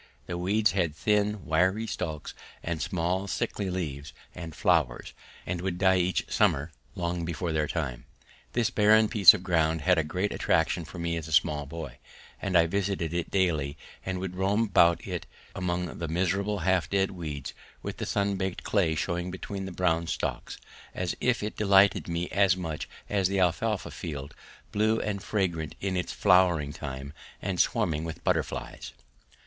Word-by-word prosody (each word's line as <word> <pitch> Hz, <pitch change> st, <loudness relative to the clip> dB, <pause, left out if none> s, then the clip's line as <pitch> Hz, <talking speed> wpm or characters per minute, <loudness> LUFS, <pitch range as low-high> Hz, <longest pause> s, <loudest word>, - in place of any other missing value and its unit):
These 90 Hz, -, -4 dB
weeds 100 Hz, +5 st, +2 dB
had 85 Hz, -6 st, 0 dB
thin 105 Hz, +1 st, +1 dB
wiry 95 Hz, +7 st, +2 dB
stalks 80 Hz, -7 st, -4 dB, 0.3 s
and 80 Hz, -1 st, -3 dB
small 90 Hz, +3 st, -1 dB
sickly 100 Hz, +2 st, -2 dB
leaves 75 Hz, -6 st, -4 dB, 0.2 s
and 85 Hz, -3 st, -8 dB
flowers, 80 Hz, -9 st, +1 dB, 0.3 s
and 85 Hz, -1 st, -3 dB
would 90 Hz, -1 st, -2 dB
die 95 Hz, 0 st, +4 dB
each 90 Hz, 0 st, +1 dB
summer 75 Hz, +4 st, +2 dB, 0.2 s
long 85 Hz, -1 st, -2 dB
before 85 Hz, +1 st, -2 dB
their 75 Hz, -1 st, 0 dB
time. 70 Hz, -8 st, -3 dB, 0.5 s
This 120 Hz, -2 st, +1 dB
barren 110 Hz, +1 st, +5 dB
piece 100 Hz, -4 st, +8 dB
of 90 Hz, -, -6 dB
ground 80 Hz, -3 st, +1 dB
had 90 Hz, +2 st, +3 dB
a -, -, +2 dB
great 90 Hz, +7 st, -2 dB
attraction 80 Hz, +1 st, +1 dB
for 90 Hz, -, -10 dB
me 85 Hz, 0 st, -1 dB
as 80 Hz, -1 st, -5 dB
a -, -, -8 dB
small 75 Hz, -3 st, +2 dB
boy, 75 Hz, -4 st, -7 dB, 0.4 s
and 95 Hz, -2 st, +2 dB
I 85 Hz, -, +6 dB
visited 95 Hz, -2 st, -1 dB
it 85 Hz, -1 st, -2 dB
daily 80 Hz, -7 st, 0 dB, 0.3 s
and 95 Hz, -1 st, -3 dB
would 90 Hz, -1 st, -4 dB
roam 100 Hz, +4 st, +2 dB
about 85 Hz, -5 st, +4 dB
it -, -, -4 dB, 0.3 s
among 90 Hz, -1 st, -3 dB
the 85 Hz, -, -2 dB
miserable 95 Hz, +5 st, 0 dB
half 95 Hz, +1 st, +1 dB
dead 95 Hz, -1 st, +1 dB
weeds 75 Hz, -7 st, -6 dB, 0.3 s
with -, -, -5 dB
the -, -, -4 dB
sun 100 Hz, -1 st, 0 dB
baked 95 Hz, -1 st, -3 dB
clay 90 Hz, -7 st, +1 dB
showing 85 Hz, +2 st, -2 dB
between 95 Hz, +1 st, -5 dB
the 95 Hz, -, -6 dB
brown 85 Hz, -2 st, +1 dB
stalks, -, -, -3 dB, 0.4 s
as 90 Hz, -1 st, -2 dB
if 125 Hz, -3 st, +1 dB
it 105 Hz, -, -3 dB
delighted 100 Hz, -1 st, +4 dB
me 85 Hz, 0 st, -2 dB
as 95 Hz, -2 st, +3 dB
much 80 Hz, -4 st, -4 dB, 0.2 s
as 100 Hz, -3 st, +1 dB
the 100 Hz, +1 st, 0 dB
alfalfa 95 Hz, +4 st, 0 dB
field, 70 Hz, -4 st, -6 dB, 0.4 s
blue 110 Hz, +2 st, +2 dB
and 100 Hz, -2 st, -2 dB
fragrant 85 Hz, -9 st, -1 dB
in 95 Hz, -1 st, -2 dB
its 90 Hz, -, -2 dB
flowering 85 Hz, -6 st, +3 dB
time 70 Hz, 0 st, -6 dB, 0.3 s
and 95 Hz, -3 st, -3 dB
swarming 85 Hz, -9 st, +1 dB
with 80 Hz, -1 st, -6 dB
butterflies. -, -, -2 dB
90 Hz, 170 wpm, -28 LUFS, 80-95 Hz, 0.5 s, piece